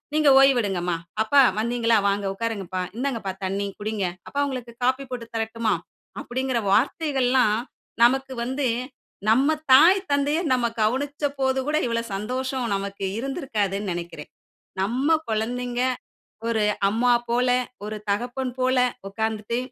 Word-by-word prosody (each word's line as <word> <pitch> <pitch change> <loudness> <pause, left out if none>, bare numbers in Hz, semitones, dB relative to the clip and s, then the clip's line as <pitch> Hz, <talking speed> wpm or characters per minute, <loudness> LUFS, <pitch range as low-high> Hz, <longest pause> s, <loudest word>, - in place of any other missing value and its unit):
நீங்க 305 -2 +5
ஓய்வேடுங்கமா 200 -10 +3 0.3
அப்பா 280 +6 +5 0.2
வந்தீங்களா, 230 0 +2
"வாங்க 200 0 0
உட்காருங்கப்பா. 195 -4 -3 0.2
இந்தாங்கப்பா 235 -7 -2
தண்ணீ. 195 +2 -1
குடிங்க. 210 -1 -2 0.2
அப்பா 285 - -4
உங்களுக்கு 250 -3 -6
காஃபி 260 +2 +1
போட்டு 240 -2 -5
தரட்டுமா?" 225 -1 0 0.5
அப்டிங்குற 260 0 -2
வார்த்தைகள்லாம் 255 -2 +2 0.5
நமக்கு 265 +2 +3
வந்து, 265 +3 -2 0.6
நம்ம 270 +8 +4 0.2
தாய், 330 +9 +8
தந்தைய 285 +2 +2
நம்ம 250 -2 +1 0.2
கவனிச்சபோது 270 +2 0
கூட 305 +1 +1
இவ்வளோ 230 0 0
சந்தோஷம் 255 +5 -2
நமக்கு 195 0 -4
இருந்திருக்காதுனு 215 - -2
நெனைக்கிறேன். 170 -3 -6 0.5
நம்ம 245 +8 0 0.2
குழந்தைங்க, 240 +3 -2 0.7
ஒரு 225 -2 +1 0.3
அம்மா 240 +4 +2 0.2
போல 245 +2 +2 0.4
ஒரு 215 0 -4
தகப்பன் 245 +5 -2
போல 255 +1 +2 0.3
உட்கார்ந்துட்டு, 220 +2 -2
240 Hz, 115 wpm, -24 LUFS, 215-265 Hz, 0.7 s, தாய்